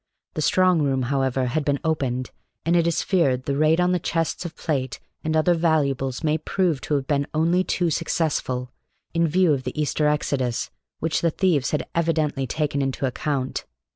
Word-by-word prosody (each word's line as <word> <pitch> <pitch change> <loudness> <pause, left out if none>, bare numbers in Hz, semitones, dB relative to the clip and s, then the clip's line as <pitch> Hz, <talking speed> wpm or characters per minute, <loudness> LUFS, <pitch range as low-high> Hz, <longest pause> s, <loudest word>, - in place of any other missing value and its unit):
The 155 - -3
strong 180 +2 +3
room, 135 -2 +1
however, 135 -1 +1
had 135 +5 -1
been 140 -1 0
opened, 135 -6 -1 0.3
and 170 +1 +3
it 170 -1 +3
is 170 - +1
feared 135 -10 +2
the 140 +1 -1
raid 155 +3 +3
on 180 0 +3
the 180 - +2
chests 165 +1 -1
of 160 -2 -6
plate 130 -5 -2 0.2
and 160 0 +1
other 165 +3 +4
valuables 145 -5 0
may 155 0 +1
prove 170 -2 0
to 150 - -1
have 135 -2 -1
been 140 -1 0
only 170 +4 +3
too 175 -2 0
successful, 140 -6 -1 0.4
in 165 0 +2
view 175 0 +3
of 135 - -1
the 130 +3 -5
Easter 150 0 +1
exodus, 135 -5 -1 0.3
which 160 0 -1
the 170 - +3
thieves 160 -5 +1
had 150 - -2
evidently 155 -5 0
taken 145 -1 -1
into 135 0 -1
account. 135 +1 -2
150 Hz, 185 wpm, -24 LUFS, 135-165 Hz, 0.4 s, other